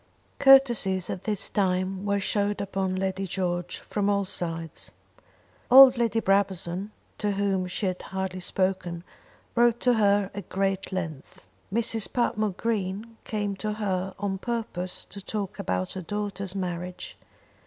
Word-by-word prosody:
Courtesies 240 -9 +5
at 180 - -6
this 210 -3 +1
time 185 0 0
were 200 0 +1
showered 205 +1 0
upon 195 -1 -1
Lady 190 0 -2
George 175 -1 -2
from 205 -1 -2
all 200 -1 +2
sides. 165 -3 -4 0.8
Old 260 +1 +10
Lady 230 -2 +1
Brabazon, 195 -2 0 0.3
to 205 -1 0
whom 195 -2 0
she 180 +3 -3
had 185 -1 -2
hardly 190 -1 -4
spoken, 185 -2 -1 0.5
wrote 240 0 +3
to 250 - +4
her 205 -3 +3
at 200 -3 -7
great 195 0 -1
length. 160 -7 -6 0.3
Mrs. 225 0 0
Patmore 215 -5 0
Green 220 0 -2
came 205 -2 -2
to 215 +1 -2
her 190 -3 -2
on 195 -1 -2
purpose 220 -6 -3
to 200 - -9
talk 205 -2 -4
about 90 0 -1
her 190 - -5
daughter's 200 0 -4
marriage. 180 -1 -4
195 Hz, 140 wpm, -27 LUFS, 185-210 Hz, 0.8 s, Old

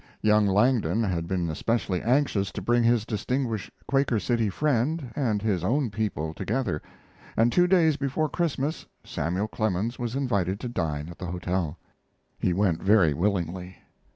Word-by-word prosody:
Young 105 -1 +4
Langdon 105 -1 +2
had 85 -5 -1
been 90 -2 -1
especially 95 +1 -1
anxious 120 -6 +1
to 105 - -4
bring 120 +4 +3
his 115 -2 +3
distinguished 115 0 -2 0.2
Quaker 135 -5 +2
City 115 +2 0
friend 140 - 0
and 110 -8 0
his 100 -6 0
own 125 +4 +1
people 95 -7 -2
together, 120 - -2 0.6
and 115 +2 +4
two 180 +5 +4
days 165 -5 +4
before 140 +3 0
Christmas 155 -2 -2 0.2
Samuel 90 +5 -2
Clemens 110 +2 -1
was 120 0 -3
invited 100 -8 0
to - - -3
dine 75 -8 -2
at 85 - -11
the 90 - -5
hotel. 90 -2 -2 0.6
He - - +1
went 90 -2 +1
very 95 -6 +4
willingly. 90 +1 -2
105 Hz, 155 wpm, -26 LUFS, 90-125 Hz, 0.6 s, Young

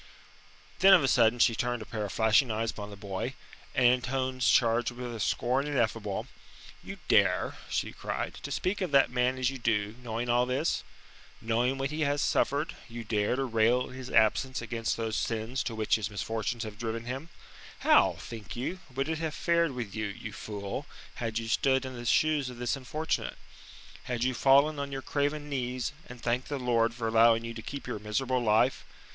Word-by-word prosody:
Then 195 0 +9
of 170 - +3
a - - +3
sudden 120 -2 +4
she 120 - +4
turned 120 0 -2
a - - -13
pair 110 0 -4
of 100 - -5
flashing 110 +6 +3
eyes 110 +1 -1
upon 105 -1 -7
the 100 - -9
boy, 100 -1 -4 0.4
and 130 - +3
in 125 +1 +5
tones 130 0 0
charged 120 -1 +3
with 120 0 -6
a 115 - -6
scorn 130 +7 0
ineffable: 115 -7 -1 0.6
"You - - -7
dare," - - +3
she - - -1
cried, - - -4
"to - - -6
speak 195 +3 -1
of 185 - 0
that 140 -3 +4
man 125 +1 +1
as 130 0 +1
you 135 - -7
do, 105 -3 0
knowing 120 0 -3
all 120 +1 +3
this? 135 +6 0 0.6
Knowing 120 +4 0
what 135 +1 -2
he 155 +1 -3
has 145 -1 +1
suffered, 145 +1 +1
you 115 0 -6
dare 105 +1 0
to 135 - -1
rail 120 +1 +2
in - - -10
his 130 -1 -7
absence 120 +4 +2
against 115 -1 -2
those 110 -1 -2
sins 115 +3 -1
to 115 - -3
which 110 0 +2
his 105 -1 -3
misfortunes 110 +3 -3
have 105 -1 -8
driven 115 0 -3
him? 135 +6 -5 0.5
How, - - +5
think 110 -4 -8
you, 135 +10 -3 0.2
would 135 +2 0
it 160 -1 -2
have 160 -2 -3
fared 170 -3 +2
with 120 -6 -5
you, 110 0 -2
you 110 +1 -7
fool, 100 +6 -5 0.3
had 115 -2 -3
you 115 -1 -3
stood 130 +3 +2
in 130 - -6
the 120 -1 -7
shoes 150 0 +2
of 125 - -9
this 120 +1 -1
unfortunate? 150 +4 -3 0.7
Had 120 -1 -2
you 130 0 +1
fallen 140 +4 +4
on 140 0 -4
your 135 -1 -5
craven 145 +1 -1
knees, 130 -1 -2
and 125 0 -10
thanked 120 +2 -1
the 145 - -2
Lord 120 -2 +1
for 115 -2 -2
allowing 115 0 +5
you 115 - -5
to 115 - -7
keep 140 +4 -7
your 125 -4 -4
miserable 125 +5 -1
life? 110 -1 +2
120 Hz, 200 wpm, -29 LUFS, 115-135 Hz, 0.7 s, Then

